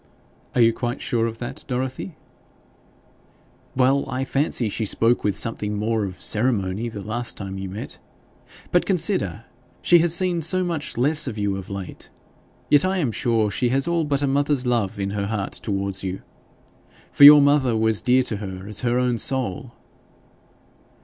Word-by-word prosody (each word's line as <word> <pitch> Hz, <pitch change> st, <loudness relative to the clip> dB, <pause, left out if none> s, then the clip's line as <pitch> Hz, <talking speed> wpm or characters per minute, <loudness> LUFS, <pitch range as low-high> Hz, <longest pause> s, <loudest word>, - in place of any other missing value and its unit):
'Are 125 Hz, -, +3 dB
you 115 Hz, 0 st, +5 dB
quite 120 Hz, +3 st, -4 dB
sure 115 Hz, -1 st, -1 dB
of 115 Hz, 0 st, -6 dB
that, 120 Hz, +1 st, -7 dB
Dorothy?' 130 Hz, +6 st, -4 dB, 1.6 s
'Well 135 Hz, +2 st, +2 dB
I 130 Hz, 0 st, -2 dB
did 135 Hz, -, -9 dB
fancy 135 Hz, -4 st, 0 dB
she 110 Hz, +2 st, -3 dB
spoke 115 Hz, +4 st, +1 dB
with 100 Hz, -2 st, -1 dB
something 105 Hz, -3 st, -2 dB
more 110 Hz, 0 st, -1 dB
of 95 Hz, -2 st, -8 dB
ceremony 105 Hz, -1 st, 0 dB
the 105 Hz, -3 st, -8 dB
last 120 Hz, +3 st, -3 dB
time 95 Hz, -1 st, -6 dB
you 95 Hz, 0 st, -6 dB
met. 100 Hz, +4 st, -8 dB, 0.7 s
But, 175 Hz, -, +2 dB
consider, 180 Hz, -, +1 dB, 0.4 s
she 175 Hz, -, +5 dB
has 170 Hz, 0 st, +2 dB
seen 175 Hz, 0 st, +1 dB
so 185 Hz, +4 st, +1 dB
much 165 Hz, -7 st, -4 dB
less 145 Hz, +4 st, +2 dB
of 115 Hz, -4 st, -5 dB
you 100 Hz, -1 st, -1 dB
of 95 Hz, -1 st, -8 dB
late. 100 Hz, -3 st, -8 dB, 0.6 s
Yet 145 Hz, -, +5 dB
I 190 Hz, +1 st, 0 dB
am 145 Hz, -10 st, 0 dB
sure 110 Hz, -2 st, 0 dB
she 120 Hz, +5 st, 0 dB
has 135 Hz, +4 st, 0 dB
all 170 Hz, -1 st, 0 dB
but 145 Hz, -1 st, -1 dB
a -, -, +1 dB
mother's 140 Hz, -1 st, +1 dB
love 115 Hz, -4 st, -1 dB
in 100 Hz, 0 st, -2 dB
her 100 Hz, -1 st, -3 dB
heart 105 Hz, -2 st, -3 dB
towards 100 Hz, -2 st, -3 dB
you. 95 Hz, 0 st, -5 dB, 0.9 s
For -, -, +3 dB
your 145 Hz, +1 st, +11 dB
mother 140 Hz, -5 st, +2 dB
was 110 Hz, -1 st, +1 dB
dear 130 Hz, +1 st, +3 dB
to 110 Hz, -4 st, -2 dB
her 95 Hz, -2 st, -8 dB
as 105 Hz, -1 st, -1 dB
her 120 Hz, 0 st, 0 dB
own 125 Hz, -2 st, 0 dB
soul.' 125 Hz, -1 st, -1 dB
120 Hz, 175 wpm, -22 LUFS, 105-140 Hz, 1.6 s, your